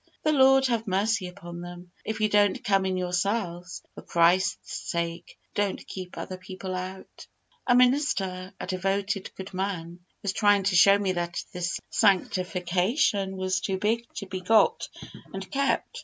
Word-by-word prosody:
The 310 Hz, -, +3 dB
Lord 270 Hz, -2 st, +5 dB
have 235 Hz, -3 st, 0 dB
mercy 200 Hz, +1 st, +1 dB
upon 175 Hz, -2 st, -9 dB
them! 175 Hz, 0 st, -10 dB
If 220 Hz, 0 st, -4 dB
you 215 Hz, -, +4 dB
don't 205 Hz, -1 st, +2 dB
come 195 Hz, -1 st, +2 dB
in 185 Hz, -1 st, -1 dB
yourselves, 180 Hz, 0 st, -2 dB
for -, -, -10 dB
Christ's 180 Hz, +4 st, +2 dB, 0.2 s
sake 170 Hz, 0 st, -3 dB, 0.2 s
don't 205 Hz, -1 st, -1 dB
keep 185 Hz, -2 st, -8 dB
other 185 Hz, -, -5 dB
people 185 Hz, 0 st, -7 dB
out. 185 Hz, +1 st, -7 dB, 0.4 s
A 245 Hz, -, +5 dB
minister 205 Hz, -8 st, +2 dB
a -, -, -4 dB
devoted, 195 Hz, +2 st, -1 dB
good 190 Hz, +1 st, -8 dB
man 180 Hz, -3 st, -3 dB, 0.2 s
was 195 Hz, -2 st, -1 dB
trying 205 Hz, -1 st, +4 dB
to 195 Hz, -1 st, +1 dB
show 195 Hz, +3 st, +7 dB
me 200 Hz, -2 st, 0 dB
that 175 Hz, -1 st, -3 dB
this 175 Hz, -1 st, -3 dB
sanctification 190 Hz, -, +1 dB
was 185 Hz, 0 st, 0 dB
too 190 Hz, -1 st, -1 dB
big 225 Hz, +4 st, -1 dB
to 200 Hz, -, -5 dB
be 185 Hz, -1 st, -5 dB
got 225 Hz, -, +3 dB, 0.5 s
and 195 Hz, 0 st, -7 dB
kept. 275 Hz, 0 st, 0 dB
190 Hz, 155 wpm, -27 LUFS, 180-205 Hz, 0.5 s, show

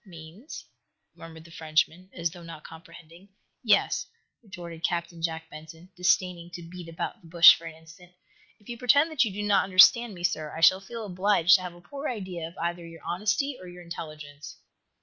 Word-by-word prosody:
"Means?" 175 Hz, -, -11 dB, 0.5 s
murmured 160 Hz, -1 st, -12 dB
the 170 Hz, -, -16 dB
Frenchman, 160 Hz, +3 st, -1 dB
as 170 Hz, -2 st, -3 dB
though 175 Hz, 0 st, -12 dB
not 165 Hz, -2 st, -11 dB
comprehending. 170 Hz, +2 st, -14 dB, 0.3 s
"Yes," -, -, +2 dB, 0.3 s
retorted 175 Hz, -6 st, -10 dB
Captain 170 Hz, 0 st, -2 dB
Jack 165 Hz, -1 st, -3 dB
Benson, 160 Hz, +4 st, -12 dB
disdaining 180 Hz, -1 st, 0 dB
to 175 Hz, -, -8 dB
beat 170 Hz, 0 st, -10 dB
about 165 Hz, -, -5 dB
the 170 Hz, -, -17 dB
bush 170 Hz, +1 st, +9 dB
for 165 Hz, -, -9 dB
an 160 Hz, -, -9 dB
instant. 160 Hz, +2 st, -17 dB, 0.5 s
"If 205 Hz, -, -24 dB
you 235 Hz, -1 st, -7 dB
pretend 285 Hz, +6 st, +4 dB
that 305 Hz, -5 st, +3 dB
you 215 Hz, -, -3 dB
do 205 Hz, +2 st, -5 dB
not 205 Hz, -1 st, +3 dB
understand 200 Hz, +4 st, +5 dB
me, 175 Hz, -, -10 dB
sir, 155 Hz, -3 st, -2 dB
I -, -, -6 dB
shall 185 Hz, +3 st, +6 dB
feel 225 Hz, +3 st, -8 dB
obliged 185 Hz, -2 st, +3 dB
to -, -, -9 dB
have 180 Hz, -1 st, -7 dB
a 175 Hz, -, -16 dB
poor 280 Hz, +11 st, -6 dB
idea 185 Hz, -8 st, -5 dB
of 170 Hz, -, -15 dB
either 170 Hz, +1 st, -3 dB
your 165 Hz, -1 st, -12 dB
honesty 215 Hz, +9 st, -1 dB
or 185 Hz, -, -10 dB
your 180 Hz, 0 st, -11 dB
intelligence." 155 Hz, -4 st, -9 dB
175 Hz, 190 wpm, -27 LUFS, 165-190 Hz, 0.5 s, bush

